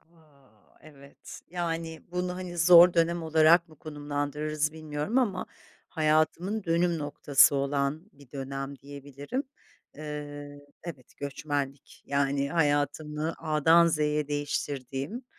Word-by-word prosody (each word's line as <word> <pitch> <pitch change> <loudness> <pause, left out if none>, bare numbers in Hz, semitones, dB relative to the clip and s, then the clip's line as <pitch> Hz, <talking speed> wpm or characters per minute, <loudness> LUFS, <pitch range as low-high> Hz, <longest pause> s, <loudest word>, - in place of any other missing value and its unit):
A! 155 -5 -26 0.3
Evet, 140 -2 -13
yani, 165 -2 -4
bunu, 180 0 -2
hani, 180 -1 -6
zor 175 +2 +8
dönem 170 0 +1
olarak 160 +2 +4
mı 155 - -17
konumlandırırız 150 0 -3
bilmiyorum 155 - -2
ama 200 -8 0 0.4
hayatımın 160 +6 +1
dönüm 170 0 +1
noktası 145 -1 +4
olan 140 +5 -1
bir 140 -3 -19
dönem 135 0 -5
diyebilirim. 145 - -6 0.5
Eee 145 -1 -7 0.2
Evet, 145 -7 -10
göçmenlik. 140 -1 -5
Yani, 140 0 0
hayatımı 150 0 0
A'dan 160 +2 +4
Z'ye 150 -2 0
değiştirdiğim, 145 - -3
150 Hz, 105 wpm, -28 LUFS, 145-165 Hz, 0.5 s, zor